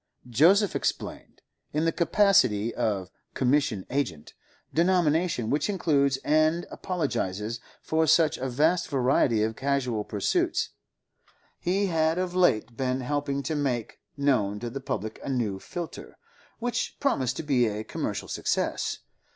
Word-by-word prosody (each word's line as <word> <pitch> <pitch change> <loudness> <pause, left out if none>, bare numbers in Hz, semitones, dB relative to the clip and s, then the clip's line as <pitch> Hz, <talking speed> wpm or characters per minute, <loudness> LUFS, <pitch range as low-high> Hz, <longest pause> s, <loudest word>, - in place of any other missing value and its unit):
Joseph 185 - +4
explained. - - -4 0.3
In 155 +2 +1
the 165 - +3
capacity 155 - +3
of 100 -6 -1 0.2
'commission 130 -7 +1
agent'—denomination 150 - -1
which 145 +6 +1
includes 145 -8 +2
and 155 +3 +3
apologises 115 - -2 0.2
for 160 0 +1
such 160 0 +4
a 130 +1 -2
vast 155 +8 +2
variety 125 -5 +2
of 110 0 -1
casual 130 -5 -1
pursuits—he 175 - -3
had 160 -2 +1
of 180 -1 -1
late 125 - +2
been 130 +1 -1
helping 140 +1 -2
to 145 - -2
make 130 -6 -2 0.2
known 115 -8 +1
to 120 +2 -5
the 135 - -5
public 110 -4 -4
a - - -5
new 115 -7 -1
filter, 170 - -7 0.4
which 245 +1 -2
promised 135 - 0
to - - -3
be 130 -5 +2
a 105 0 -3
commercial - - -4
success. - - -1
140 Hz, 125 wpm, -27 LUFS, 115-165 Hz, 0.4 s, Joseph